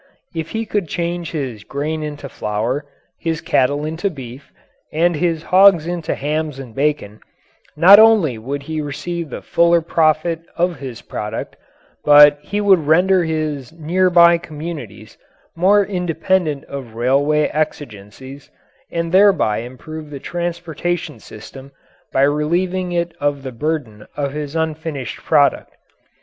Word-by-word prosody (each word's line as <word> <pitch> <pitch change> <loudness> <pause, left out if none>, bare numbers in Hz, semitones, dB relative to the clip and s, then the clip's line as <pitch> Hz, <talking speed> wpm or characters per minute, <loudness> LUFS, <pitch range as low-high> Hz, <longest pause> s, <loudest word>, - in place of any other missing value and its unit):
If 165 -1 -4
he 225 0 -3
could 205 -4 -2
change 170 +1 -3
his 130 -10 -5
grain 150 +5 -3
into 145 -2 -6
flour, 115 +5 -3 0.3
his 165 -2 -2
cattle 145 +3 +1
into 160 +6 -2
beef, 135 -3 -10 0.4
and 170 +2 +1
his 165 0 -1
hogs 185 -2 +5
into 170 -2 -3
hams 150 0 -3
and 130 -4 -9
bacon, 135 -7 -1 0.6
not 190 +6 +9
only 210 - +5
would 140 +5 -5
he 155 +1 -4
receive 165 +3 -5
the - - -7
fuller 170 0 +3
profit 160 0 +1 0.2
of 175 -3 0
his 130 -4 -8
product, 105 0 -6 0.5
but 145 0 +7
he 205 +8 -3
would 190 -7 +3
render 180 +3 +4
his 155 -5 -3
near 170 +3 0
by 170 -1 +6
communities 145 - -8 0.4
more 195 +4 +4
independent 180 -4 -1
of 130 -5 -8
railway 140 +5 +2
exigencies, 135 -3 -5 0.4
and 170 0 -2
thereby 190 - +4
improve 150 +6 -9
the 140 -2 -7
transportation 170 -3 -4
system 130 +7 -12 0.4
by 135 - +2
relieving 175 +6 0
it 170 -1 -2
of 145 -1 -1
the 130 - -5
burden 125 -5 -4
of 140 -2 -2
his 150 0 -5
unfinished 160 -4 -3
product. 145 -3 +1
155 Hz, 135 wpm, -19 LUFS, 140-170 Hz, 0.6 s, not